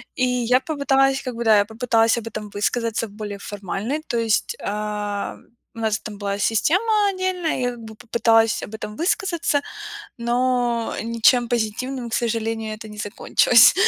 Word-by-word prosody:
И 255 - +2
я 250 0 +2
попыталась, 270 -2 +2
как 250 -3 -5
бы, 235 - -3
да, 215 -1 +6
я 205 - +5
попыталась 225 +1 +2
об 230 - -9
этом 215 -1 -6
высказаться 230 +2 -1
более 205 0 -7
формальной. 205 - -4
То 235 - -1
есть, 225 - +1
ам, 210 -1 -3 0.3
у - - -8
нас 220 -1 0
там 210 -2 -8
была 200 0 -3
система 400 - +2
отдельная, 370 -3 -1
и - - -2
я, 245 - +1
как 240 - -10
бы, 220 -1 -10
попыталась 225 0 +2
об 205 - -8
этом 210 -1 -7
высказаться, 340 -3 0 0.6
но 240 -1 0
ничем 235 +2 +3
позитивным, 240 +2 -2
к - - -2
сожалению, 225 -1 -1
это 220 0 -10
не 210 - -10
закончилось. 225 +4 +5
230 Hz, 165 wpm, -22 LUFS, 215-255 Hz, 0.6 s, да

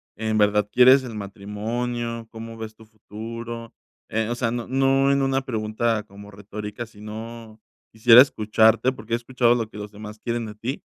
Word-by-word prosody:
¿en 110 0 -1
verdad 105 0 +3
quieres 130 +2 +7
el 115 -3 -7
matrimonio?, 115 +4 -4
¿cómo 115 0 -8
ves 110 -1 -8
tu 110 - -17
futuro?, 115 +2 -8 0.4
eh, 110 0 -1
o 120 - -1
sea, 120 -1 -1
no 120 -1 -4
no 135 +1 +3
en 140 0 +2
una 135 0 +1
pregunta 110 -2 -1
como 100 0 -13
retórica, 105 +3 -7
sino, 110 +1 -9 0.3
quisiera 115 +2 +8
escucharte 110 0 +3
porque 115 -2 -8
he - - +5
escuchado 120 0 +2
lo 115 -2 -2
que - - -10
los 105 0 -7
demás 105 +1 -10
quieren 115 -1 -3
de 105 - -7
ti, 120 +6 -5
115 Hz, 175 wpm, -24 LUFS, 105-120 Hz, 0.4 s, quisiera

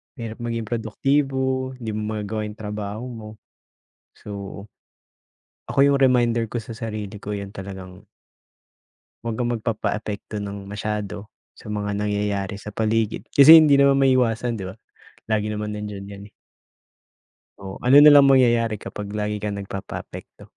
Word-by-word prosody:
Mahirap 115 -3 -7
maging 115 -1 -3
produktibo, 130 +3 0
di 115 -4 -5
mo 110 0 -3
magagawa 105 +1 -3
yung 105 - -9
trabaho 105 +1 -5
mo. 110 -2 -9 0.9
So, - - -14 1.4
ako - - -1
yung 140 - +3
reminder 120 -2 +3
ko 120 - -2
sa 115 +1 -9
sarili 110 -2 -5
ko, 105 - -5
yan 100 -1 -6
talagang 95 -1 -9 1.2
wag 115 -1 -4
kang 120 +1 -1
magpapaapekto 105 -2 -3
ng 100 0 -6
masyado 105 0 -5 0.2
sa - - -15
mga 105 -1 -3
nangyayari 105 -1 -2
sa 105 +1 -9
paligid. 110 0 -1
Kasi 155 +4 +10
hindi 150 -2 +5
naman 140 0 +4
maiiwasan, 125 -3 +2
di 100 - -6
ba? - - -14 0.6
Lagi 105 -1 +1
naman 105 0 -3
nandiyan 105 -1 -6
yan, 100 0 -10
eh. - - -43 1.3
O 95 -1 -8
ano 130 +3 +6
nalang 145 -1 +9
mangyayari 115 -4 +3
kapag 100 -1 -7
lagi 105 0 -2
kang 100 -1 -3
nagpapaapekto? 100 0 -8
110 Hz, 140 wpm, -23 LUFS, 105-120 Hz, 1.4 s, Kasi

